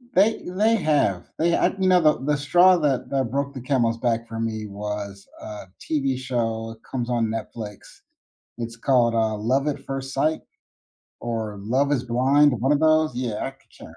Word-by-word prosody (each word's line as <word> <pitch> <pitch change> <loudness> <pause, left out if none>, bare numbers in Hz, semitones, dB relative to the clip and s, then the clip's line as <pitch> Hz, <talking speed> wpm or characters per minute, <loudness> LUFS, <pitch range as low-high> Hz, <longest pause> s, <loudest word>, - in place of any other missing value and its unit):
They 215 +4 +3
they 210 +5 +2
have. 145 - +1
They 170 +1 +3
I - - +3
you 190 - +2
know, 180 -1 +6
the 155 -5 +3
the 150 0 +1
straw 175 +6 +5
that 145 -6 0
that 135 -4 -1
broke 140 +1 -2
the 130 - -7
camel's 120 -3 +1
back 115 -1 -1
for 115 0 -6
me 110 -2 -3
was 100 -1 -6
a 105 -2 -8
TV 135 -4 -1
show, 115 -3 -3
comes 125 -2 -3
on 120 -2 +1
Netflix. 110 -1 -8 0.6
It's 115 -1 -5
called, 120 -1 +2
uh, 110 -1 +1
Love 130 +7 0
at 145 - -3
First 135 0 -5
Sight 155 +3 +1 0.8
or 110 -3 -4
Love 130 +7 +1
Is 130 -3 0
Blind, 130 +2 +3
one 135 +3 +2
of 145 - +3
those. 155 -2 +3
Yeah, 120 -4 -3
I - - -3
c 135 - -23 0.2
can't - - -24
remember. 80 - -12
125 Hz, 190 wpm, -23 LUFS, 115-145 Hz, 0.8 s, know